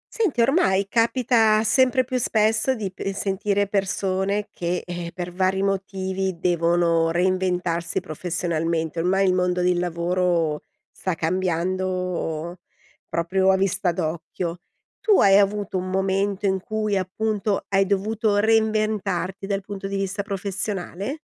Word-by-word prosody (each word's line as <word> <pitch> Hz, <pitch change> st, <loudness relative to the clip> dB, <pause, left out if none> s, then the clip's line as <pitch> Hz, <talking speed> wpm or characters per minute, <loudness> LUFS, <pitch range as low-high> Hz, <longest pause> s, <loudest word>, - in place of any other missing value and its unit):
Senti, 375 Hz, -, +1 dB
ormai 230 Hz, -, +2 dB
capita 230 Hz, -2 st, +3 dB
sempre 255 Hz, +3 st, +3 dB
più 255 Hz, 0 st, -2 dB
spesso 220 Hz, +2 st, +2 dB
di 205 Hz, -5 st, -4 dB
p 195 Hz, +1 st, -4 dB
sentire 200 Hz, +1 st, 0 dB
persone 195 Hz, 0 st, -1 dB
che, 175 Hz, -2 st, -2 dB
eh, 175 Hz, -1 st, -6 dB
per 180 Hz, -1 st, -5 dB
vari 190 Hz, +1 st, 0 dB
motivi 190 Hz, -1 st, -2 dB
devono 170 Hz, -1 st, +2 dB
reinventarsi 180 Hz, -1 st, 0 dB
professionalmente. 165 Hz, -1 st, -2 dB
Ormai 190 Hz, +3 st, +2 dB
il 185 Hz, -, +3 dB
mondo 180 Hz, 0 st, +1 dB
del 180 Hz, 0 st, +2 dB
lavoro 170 Hz, -2 st, 0 dB, 0.3 s
sta 185 Hz, -3 st, -3 dB
cambiando 180 Hz, -1 st, -2 dB, 0.5 s
proprio 190 Hz, +3 st, +1 dB
a -, -, +4 dB
vista 190 Hz, -1 st, +1 dB
d'occhio. 170 Hz, +1 st, -4 dB, 0.4 s
Tu 425 Hz, -3 st, +4 dB
hai 195 Hz, -1 st, +6 dB
avuto 200 Hz, -1 st, +1 dB
un 185 Hz, 0 st, -3 dB
momento 195 Hz, +1 st, 0 dB
in 190 Hz, -1 st, +2 dB
cui, 215 Hz, +1 st, -1 dB
appunto, 205 Hz, +2 st, -1 dB
hai 195 Hz, 0 st, +3 dB
dovuto 205 Hz, +2 st, 0 dB
reinventarti 215 Hz, -3 st, +1 dB
dal 200 Hz, -1 st, -1 dB
punto 195 Hz, 0 st, -6 dB
di 200 Hz, -, -4 dB
vista 195 Hz, +1 st, -2 dB
professionale? 200 Hz, -, -4 dB
190 Hz, 125 wpm, -23 LUFS, 180-205 Hz, 0.5 s, hai